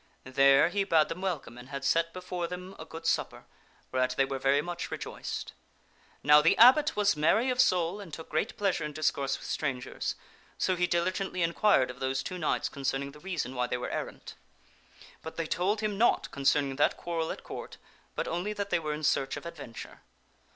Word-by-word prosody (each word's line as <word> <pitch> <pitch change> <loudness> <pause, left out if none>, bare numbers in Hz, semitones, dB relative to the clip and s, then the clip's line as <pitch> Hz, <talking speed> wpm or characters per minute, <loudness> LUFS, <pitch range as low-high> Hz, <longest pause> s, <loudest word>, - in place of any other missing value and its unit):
There 135 +4 +5
he 200 +2 0
bade 165 -5 +3
them 165 +3 -5
welcome 160 -10 -3
and 125 +2 -12
had 140 -1 -5
set 165 +3 +2
before 180 -1 -4
them 180 +2 -7
a 160 - -7
good 165 0 -9
supper, 160 - -1 0.5
whereat 130 0 +1
they 135 - +4
were 135 0 -4
very 135 +2 +3
much 175 0 -5
rejoiced. - - -5 0.7
Now 150 +1 +7
the 165 - +4
abbot 290 +7 +7
was 205 -3 +3
merry 220 - +3
of 250 0 +3
soul, 180 -3 +1
and 185 -5 -10
took 160 +1 -8
great 155 - -2
pleasure 195 -5 0
in 150 0 -4
discourse 140 -3 0
with - - -11
strangers, 130 -4 -3 0.4
so 185 - +1
he 180 0 +1
diligent 185 +3 0
ly 185 - -2
inquired 170 -5 +3
of 125 - -14
those 130 +1 -1
two 185 - -5
knights 155 - 0
concerning 140 0 -3
the 150 - -14
reason 165 -8 -3
why 125 -1 -1
they 125 - -2
were 125 - -4
errant. - - -5 0.9
But 160 - -8
they 165 - -1
told 195 +6 0
him 210 -2 -2
naught 240 - +3
concerning 140 0 +1
that 145 - +2
quarrel 165 -2 -2
at - - -7
Court, - - -8 0.4
but - - -2
only 180 +5 -2
that 200 -1 -4
they - - +3
were 155 -2 -3
in 155 - -8
search 135 -2 +1
of - - -9
adventure. 145 -9 -9
165 Hz, 200 wpm, -29 LUFS, 140-185 Hz, 0.9 s, Now